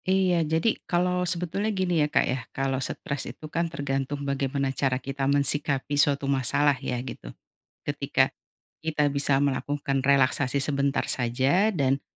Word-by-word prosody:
Iya 185 -2 +3
jadi 160 +8 0
kalau 180 0 +1
sebetulnya 180 +4 -1
gini 180 -4 +1
ya 150 - +2
Kak - - +3
ya, 130 0 -1 0.2
kalau 135 -1 0
stres 140 +1 -3
itu - - -10
kan 170 0 0
tergantung 140 -2 -3
bagaimana 140 0 -1
cara 135 -2 0
kita 135 +1 -3
mensikapi 140 0 +1
suatu 145 -1 +3
masalah 140 +2 +2
ya 125 -2 -2
gitu, - - -8 0.6
ketika, - - +1 0.5
kita 155 -2 0
bisa 140 -1 +2
melakukan 140 0 -1
relaksasi 135 0 +2
sebentar 140 0 0
saja 130 - +1
dan, 140 -8 +1
140 Hz, 145 wpm, -26 LUFS, 135-160 Hz, 0.6 s, Iya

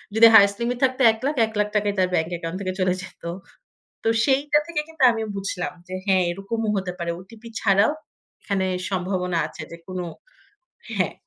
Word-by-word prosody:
যদি 230 +1 +9
highest 200 -1 +7
limit 240 +1 -1
থাকতো 260 0 +2
৳১,০০,০০০, 255 +3 -1
৳১,০০,০০০ 210 -1 0
ই - - -7
তার 185 -1 +3
ব্যাংক 160 0 +1
অ্যাকাউন্ট 170 +1 -4
থেকে 185 -1 -2
চলে 185 -1 +2
যেত। 185 - -13 0.8
তো - - -1 0.2
সেইটা 290 +2 +3
থেকে 335 -3 -1
কিন্তু 320 -4 -3
আমি 225 -1 -3
বুঝলাম, 190 -2 -3
যে 185 - -8
হ্যাঁ, 190 -2 +3
এরকমও 210 +4 -3
হতে 185 -1 -2
পারে। 170 0 -2
ওটিপি 220 +5 -13
ছাড়াও 200 +7 +4 0.5
এখানে 195 -2 -1 0.2
সম্ভাবনা 180 -2 -1
আছে - - -9
যে 170 - -8
কোনো 185 -1 -4 0.9
হ্যাঁ। 185 -3 +1
200 Hz, 170 wpm, -23 LUFS, 185-230 Hz, 0.9 s, যদি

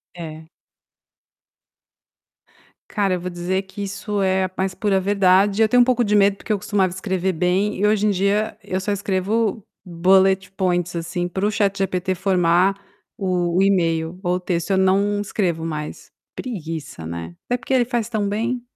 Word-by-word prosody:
É. 160 -2 -8 2.4
Cara, 195 -3 +1
eu - - -4
vou 180 - -4
dizer 180 +2 -2
que 190 +1 -9
isso 200 +1 -3
é 190 0 +2
a 185 - -6
mais 190 0 -1
pura 200 -2 +1
verdade. 195 +1 +3
Eu 220 - +6
tenho 245 +2 +5
um - - +8
pouco 245 -1 +2
de 210 -1 +1
medo 200 -1 +4
porque 215 - -2
eu - - +1
costumava 195 -3 0
escrever 190 -1 -1
bem 180 +5 +1
e 205 - +1
hoje 210 0 +2
em 210 - +3
dia, 200 +4 0
eu 190 -1 -2
só 200 +2 -2
escrevo 205 +2 -1 0.2
bullet 190 +2 +3
points, 175 -2 -1
assim, 175 +1 -2
para 190 +3 -2
o 210 - +2
ChatGPT 195 -3 0
formar 180 0 +2 0.4
o 180 -3 0
o - - +4
e-mail 170 -3 +1
ou 180 0 +1
o - - -1
texto. 180 0 -2
Eu 190 - +3
não 200 +2 +2
escrevo 175 -6 -1
mais. 150 -2 -6 0.2
Preguiça, 160 - -6
né. 85 +1 -6
Até 245 - 0
porque 245 +2 -4
ele 245 -2 +4
faz 240 -3 -1
tão 210 -3 -1
bem. 235 +4 -1
190 Hz, 175 wpm, -21 LUFS, 180-205 Hz, 2.4 s, um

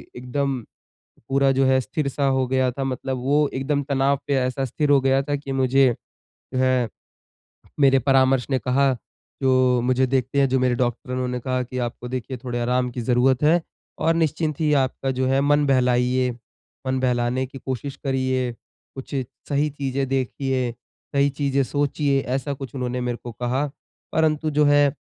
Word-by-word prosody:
एकदम 130 +1 -2 0.7
पूरा 135 0 +3
जो 135 0 +2
है, 130 0 +4
स्थिर-सा 140 0 -2
हो 130 -1 +2
गया 130 0 +1
था। 135 +2 -4
मतलब 130 0 -3
वो 145 +2 +2
एकदम 140 +2 0
तनाव 140 0 +2
पे 140 - 0
ऐसा 130 +1 0
स्थिर 145 +4 -1
हो 140 -1 +6
गया 135 +1 +3
था 145 0 -1
कि 140 -1 -6
मुझे 130 -1 +3 0.6
है 130 -2 +2 0.9
मेरे 135 -1 +5
परामर्श 130 -1 +3
ने 130 -2 +1
कहा 130 +4 +2 0.5
जो 130 -2 +3
मुझे 130 +1 +2
देखते 130 +1 0
हैं 135 - +4
जो 130 0 +2
मेरे 125 -1 +2
डॉक्टर 120 +1 -2
उन्होंने 125 -1 -2
कहा 130 +1 -1
कि, 130 +1 -7
"आपको 120 0 -4
देखिए 130 +1 -4
थोड़ा 120 -1 -3
आराम 125 +1 +1
की 120 - -4
ज़रूरत 125 +3 +2
है 165 +3 +4 0.4
और 165 - +2
निश्चिंत 155 -1 0
ही 155 -2 +2
आपका 130 +1 -2
जो 130 0 -1
है 135 +1 +2
मन 145 +1 +3
बहलाइए, 125 -1 +2 0.6
मन 130 0 0
बहलाने 125 0 0
की 135 +1 -10
कोशिश 135 +1 -4
करिए, 130 -2 0 0.4
कुछ 135 +1 -7 0.3
सही 145 +1 +1
चीज़ें 135 -1 -2
देखिए, 130 -1 -1 0.4
सही 140 0 +3
चीज़ें 140 -1 0
सोचिए" 145 0 0
ऐसा 135 +3 -2
कुछ 135 0 -8
उन्होंने 125 -1 -2
मेरे 120 -1 -2
को 120 - -6
कहा। 125 +5 -1 0.5
परंतु 155 -1 +1
जो 150 0 +3
है 145 -1 +4
130 Hz, 170 wpm, -23 LUFS, 125-140 Hz, 0.9 s, हो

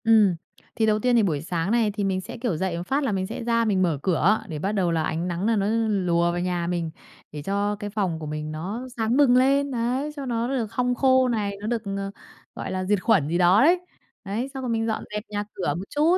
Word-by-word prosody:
Ừm. 215 -5 +5 0.4
Thì 225 - +2
đầu 215 -1 +2
tiên 245 +2 +2
thì 230 - +5
buổi 155 -7 0
sáng 170 +3 -2
này 230 -3 +2
thì 205 0 -3
mình 190 -1 0
sẽ, 235 +6 -8
kiểu, 230 -8 -1
dậy 185 -1 -1
một 170 - -4
phát 280 +2 +1
là 265 - 0
mình 190 -1 -1
sẽ - - -5
ra 230 0 +2
mình 200 -4 +2
mở 170 -5 +2
cửa 190 +4 +3
để 155 -5 -5
bắt 195 +6 -1
đầu 190 -5 +1
là 165 -1 +1
ánh 165 +3 -2
nắng 175 +2 -2
nà 225 +1 +3
nó 200 -2 +1 0.2
lùa 175 -4 +2
vào 175 - -2
nhà 175 -1 -1
mình, 170 -2 -2 0.4
để 150 - -6
cho 200 +4 -1
cái 205 0 -6
phòng 195 -6 -1
của 155 - -6
mình 150 0 -4
nó 195 +11 -5
sáng 225 +2 +1
bừng 275 -4 +5
lên, 275 +2 +3
đấy, 255 +4 -1
cho 280 -2 -5
nó 235 -2 -1
nó 270 - -2
được 225 -4 -2
hong 250 -1 +1
khô 260 0 +4
này, 205 -4 -1
nó 210 - -4
được, 235 -1 0
ờ, 195 0 -3 0.4
gọi - - -5
là, 185 0 -2
diệt 200 0 +1
khuẩn 190 -11 +3
gì 170 +3 0
đó 180 +4 +5
đấy. 345 +4 +5 0.5
Đấy, 215 +6 -2
xong 265 -1 -5
rồi 250 - -2
mình 225 -1 0
dọn 220 - -2
dẹp 210 0 -3
nhà 205 -1 -2
cửa 175 -6 -1
một 175 - -4
chút 315 +5 +3
205 Hz, 265 wpm, -25 LUFS, 180-235 Hz, 0.5 s, Ừm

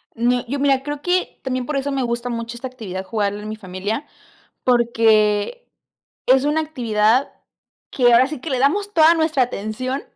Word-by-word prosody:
No, 245 +1 +1
yo 280 +4 -3
mira, 275 -1 +2
creo 290 0 -5
que 360 +2 -1
también 255 -1 -2
por 300 - -3
eso 275 +1 -1
me 270 -1 -1
gusta 235 0 -2
mucho 230 0 -4
esta 250 +2 -6
actividad 210 -7 -7
jugarla 205 0 -2
en 215 - -7
mi 215 - -4
familia, 205 +6 -4 0.6
porque 230 - +2 0.6
es 260 +1 +4
una 300 +2 +1
actividad 245 -5 +1 0.6
que 245 -2 +3
ahora 255 +3 +5
sí 305 -3 -6
que 300 - -6
le 260 - 0
damos 400 +10 +1
toda 320 0 +6
nuestra 315 -4 +1
atención, 250 +3 -3
250 Hz, 175 wpm, -20 LUFS, 225-280 Hz, 0.6 s, toda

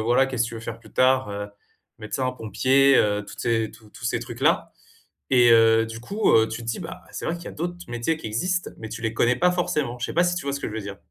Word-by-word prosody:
voilà, 120 +3 +4
qu'est-ce 125 -3 0
que 115 - -4
tu 115 - -8
veux 115 - -6
faire 115 0 -6
plus 115 - -18
tard? 130 -1 +3
Heu, 100 0 -5 0.5
médecin, 130 +4 -2
pompier, 130 +4 +3
heu, 105 0 +1
toutes 100 - -9
ces 115 -2 0
tous 110 -1 -17
tous - - -12
ces - - 0
trucs-là - - 0 0.6
et 125 -2 +6
heu, 115 0 +6
du 115 0 -8
coup, 205 - +1
heu, 110 0 +5
tu 115 +2 -6
te - - -10
dis, 115 - -2
bah, - - -8
c'est - - -6
vrai 165 - 0
qu'il 170 - -11
y - - -6
a - - -6
d'autres 175 +2 -4
métiers 120 +7 -1
qui 160 - -8
existent, 180 +12 -1
mais 110 - -7
tu 115 - -7
les 110 -1 -1
connais 120 +2 +2
pas 180 +4 +3
forcément. 150 -8 -1
Je 120 - -2
sais - - -6
pas 175 +2 +4
si 175 0 0
tu 160 - -4
vois 140 - -1
ce 140 - -4
que - - -3
je - - -8
veux 110 - -3
dire? 100 -1 -7
120 Hz, 285 wpm, -24 LUFS, 110-140 Hz, 0.6 s, et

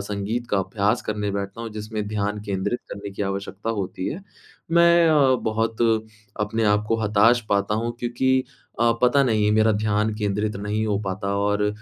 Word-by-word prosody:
संगीत 105 +4 -3
का 100 - +2
अभ्यास 105 +4 0
करने 105 -1 -2
बैठता 100 +2 -4
हूँ, 115 -1 -5
जिसमें 105 0 -5
ध्यान 105 0 -2
केंद्रित 100 +4 -2
करने 100 0 -6
की 100 - -4
आवश्यकता 100 +2 -3
होती 95 -3 -3
है। 180 +6 -5 0.5
मैं 170 0 +5
अ, 140 -4 +4
बहुत 110 0 -1 0.6
अपने 110 +2 0
आप 105 0 +2
को 115 - +2
हताश 110 +4 +4
पाता 100 +1 +1
हूँ 115 +2 -1
क्योंकि 130 +2 +1 0.4
अ, 120 0 +4
पता 140 +3 +5
नहीं 110 -4 +2
मेरा 110 0 +4
ध्यान 105 +1 0
केंद्रित 105 0 -2
नहीं 105 +2 -2
हो 100 -2 0
पाता 100 +1 -2
और 105 0 +1
105 Hz, 175 wpm, -23 LUFS, 100-115 Hz, 0.6 s, मैं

